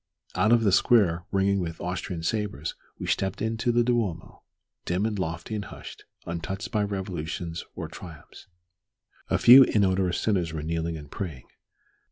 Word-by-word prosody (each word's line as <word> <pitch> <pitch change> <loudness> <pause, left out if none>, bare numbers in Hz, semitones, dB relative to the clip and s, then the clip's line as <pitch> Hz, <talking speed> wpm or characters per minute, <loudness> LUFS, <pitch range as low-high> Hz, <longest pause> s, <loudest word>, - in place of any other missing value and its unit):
Out 110 - +2
of 120 -1 +5
the 100 - +3
square, 90 -5 +3
ringing 100 0 +2
with 85 -2 -4
Austrian 90 -1 -4
sabres, 100 -6 -2 0.2
we - - -6
stepped 95 -1 -1
into 115 +3 0
the 120 0 +3
Duomo, 115 -9 -2 0.4
dim 90 +4 -1
and 105 -3 -2
lofty 85 +4 -4
and 105 -2 -3
hushed, - - -11 0.2
untouched 85 +4 -5
by 105 - +1
revolutions 90 -4 -4
or - - -5
triumphs. 85 -4 -12 0.8
A - - +2
few 130 +3 +9
inodorous 95 -6 +1
sinners 90 -6 0
were 75 -2 -4
kneeling 80 +1 -2
and 75 -2 -11
praying. 80 -10 -6
95 Hz, 155 wpm, -26 LUFS, 85-105 Hz, 0.8 s, few